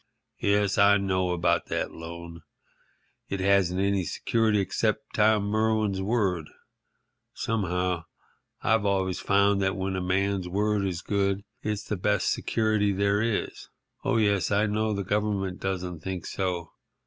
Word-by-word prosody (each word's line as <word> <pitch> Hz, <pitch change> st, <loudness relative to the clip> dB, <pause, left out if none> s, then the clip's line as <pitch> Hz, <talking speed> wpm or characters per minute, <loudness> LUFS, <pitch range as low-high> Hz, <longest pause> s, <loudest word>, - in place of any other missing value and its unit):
"Yes, 100 Hz, -1 st, +2 dB
I 100 Hz, 0 st, +6 dB
know 95 Hz, -2 st, 0 dB
about 90 Hz, -1 st, +1 dB
that -, -, -2 dB
loan. 85 Hz, 0 st, -9 dB, 0.9 s
It 100 Hz, -, -2 dB
hasn't 95 Hz, -2 st, +2 dB
any 100 Hz, -1 st, +1 dB
security 110 Hz, +5 st, +1 dB
except 110 Hz, +3 st, -1 dB
Tom 105 Hz, -1 st, +3 dB
Merwin's 110 Hz, -1 st, +1 dB
word. 95 Hz, -7 st, 0 dB, 0.9 s
Somehow, 90 Hz, -5 st, -1 dB, 0.6 s
I've 110 Hz, -2 st, +3 dB
always 95 Hz, -2 st, 0 dB
found 100 Hz, 0 st, +3 dB
that 95 Hz, -1 st, +1 dB
when 95 Hz, 0 st, -2 dB
a 95 Hz, -, -2 dB
man's 95 Hz, 0 st, 0 dB
word 105 Hz, +1 st, +1 dB
is 90 Hz, -2 st, -4 dB
good 100 Hz, -1 st, 0 dB, 0.2 s
it's 105 Hz, -1 st, -2 dB
the 105 Hz, -, -3 dB
best 105 Hz, +1 st, +1 dB
security 110 Hz, -2 st, +1 dB
there 100 Hz, +1 st, +1 dB
is. 115 Hz, -2 st, -2 dB, 0.4 s
Oh, 135 Hz, -3 st, +1 dB
yes, 100 Hz, -6 st, +2 dB
I 100 Hz, +1 st, +2 dB
know 110 Hz, +1 st, 0 dB
the 100 Hz, -1 st, -2 dB
Government 100 Hz, -1 st, -1 dB
doesn't 90 Hz, -3 st, -3 dB
think 95 Hz, +1 st, -5 dB
so. 90 Hz, -3 st, -3 dB
100 Hz, 140 wpm, -27 LUFS, 95-105 Hz, 0.9 s, I